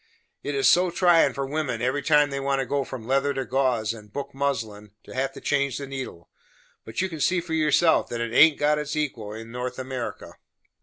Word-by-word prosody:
It 145 - -3
is 135 - +3
so 180 +1 +5
tryin' 170 -5 +4
for 140 - -2
wimmen, 140 -4 -2
every 130 +4 0
time 150 0 +3
they 140 - -2
want 135 0 0
to 135 - -1
go 140 +2 -1
from 125 -3 -8
leather 135 +3 +1
to 135 - -2
gauze 125 -4 0
and 105 -2 -13
book 140 +5 -6
muslin, 110 -7 -3
to - - -12
have 135 +1 -1
to - - -9
change 140 -2 0
the 140 - -5
needle; 130 -11 -7 0.6
but 110 +7 -4
you - - 0
can 165 -4 -8
see 175 +5 +2
for 170 -1 -6
yourself 160 +1 +3
that 120 - -4
it 115 -1 -3
haint 150 +4 +6
got 150 +1 +2
its 150 0 -4
equal 125 -9 -3
in 115 +1 -8
North 125 +1 -4
America." 130 -2 -5
135 Hz, 220 wpm, -25 LUFS, 120-150 Hz, 0.6 s, haint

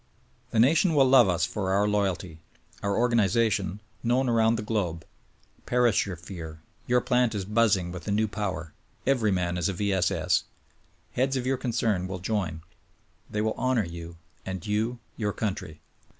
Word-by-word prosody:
The - - -3
nation 160 - +4
will 135 -2 +6
love 130 -5 +6
us 85 -2 +2
for 95 -3 -2
our 100 +2 +3
loyalty; 95 -5 -1 0.4
our 100 0 0
organization, 110 -4 +2 0.2
known 125 +3 +1
around 115 -1 +3
the 105 - -3
globe. 90 -7 -2 0.6
Perish 120 -5 +3
your 95 - -4
fear; 80 -2 -9 0.3
your 125 0 +3
plant 125 -3 +2
is 100 -2 -2
buzzing 105 -4 +2
with 90 -1 -8
the 105 - -2
new 110 +2 +2
power; 95 -6 -4 0.3
every 125 -6 +2
man 90 -1 0
is 85 - +1
a - - -1
V. 100 +2 0
S, 95 -2 +2
S.! - - +1 0.7
Heads 135 +2 0
of 125 - -3
your 135 0 +1
concern 110 -7 0
will 95 0 -4
join; 90 -5 -2 0.7
they 105 - -1
will 110 0 0
honor 130 -4 +1
you; 85 0 -8 0.3
and 95 -2 -5
you 110 +4 0
— - - -38
your 105 -2 -1
country. 90 -7 -4
105 Hz, 175 wpm, -27 LUFS, 90-115 Hz, 0.7 s, will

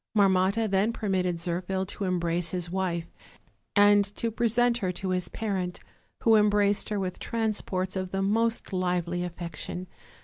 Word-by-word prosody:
Marmotta 195 +2 +3
then 195 +3 +2
permitted 190 -6 0
Zirphil 180 +3 -2
to 200 - -3
embrace 170 -2 0
his 175 -1 -3
wife 180 -3 -1 0.7
and 205 0 +6
to 230 - -1
present 240 +1 +2
her 185 -4 0
to 185 +2 -4
his 180 -1 0
parent, 190 -5 -3 0.4
who 225 -1 +6
embraced 205 -1 +3
her 210 -1 -1
with 185 -2 -3
transports 210 -5 -2
of 185 -1 -2
the 195 +1 -1
most 225 +2 +1
lively 180 -1 0
affection. 175 +1 -5
190 Hz, 145 wpm, -28 LUFS, 180-210 Hz, 0.7 s, and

